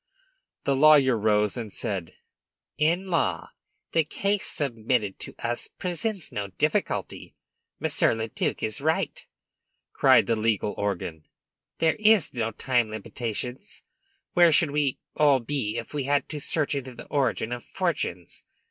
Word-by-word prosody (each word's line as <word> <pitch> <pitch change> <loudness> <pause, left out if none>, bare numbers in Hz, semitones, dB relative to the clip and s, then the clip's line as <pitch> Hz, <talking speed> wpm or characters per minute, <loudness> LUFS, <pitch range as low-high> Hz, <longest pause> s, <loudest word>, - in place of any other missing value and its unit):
The 140 - +1
lawyer 140 -3 +6
rose, 105 -1 +2
and 115 -4 -5
said: 95 -8 -4 0.6
"In 170 +5 +2
law, 90 - 0 0.4
the 165 - +3
case 200 +6 -1
submitted 115 - -1
to - - -8
us 120 0 -2
presents 185 +1 -3
no 100 -1 -3
difficulty. 95 - -2 0.4
Monsieur - - +2
le 110 0 -3
duc - - -2
is 110 +3 -1
right!" 160 +2 -1 0.7
cried - - +5
the 115 - +1
legal 110 -2 0
organ. 85 -6 -3 0.5
"There 160 +5 +1
are 120 - 0
time 120 -1 +1
limitations. 115 +3 -5 0.5
Where 175 -1 +6
should 155 -1 +4
we 145 -2 0 0.2
all 145 -3 +4
be 120 -3 -2
if 115 +3 -6
we 145 -3 -2
had 145 +1 +1
to 150 - -4
search 145 +1 0
into 130 -3 -4
the - - -9
origin 130 -5 0
of 120 0 -4
fortunes? - - -3
125 Hz, 140 wpm, -26 LUFS, 110-150 Hz, 0.7 s, lawyer